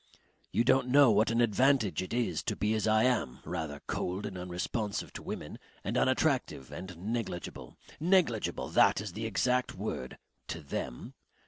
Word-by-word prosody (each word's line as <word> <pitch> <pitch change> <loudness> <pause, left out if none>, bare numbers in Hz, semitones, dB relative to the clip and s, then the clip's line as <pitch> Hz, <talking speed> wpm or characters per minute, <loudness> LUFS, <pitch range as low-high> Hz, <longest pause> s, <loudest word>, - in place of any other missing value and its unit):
You 115 - +2
don't 130 +1 +3
know 135 -1 +6
what 105 +1 +3
an 115 +1 +2
advantage 120 - +3
it 95 - -6
is 120 0 0
to - - -1
be 105 +1 0
as 110 0 0
I 110 0 +4
am, 120 - +1
rather 75 -2 -4
cold 95 +3 -2
and 95 - -5
unresponsive 90 +4 -3
to - - -7
women - - -6 0.2
and - - -2
unattractive 65 - +1
and 90 -2 -7
negligible 105 -2 -4 0.2
negligible, 165 - +2
that - - +4
is - - -5
the - - -3
exact 125 0 +1
word 65 0 -4 0.3
to 80 - -5
them. 65 -3 -5
110 Hz, 160 wpm, -31 LUFS, 90-125 Hz, 0.3 s, know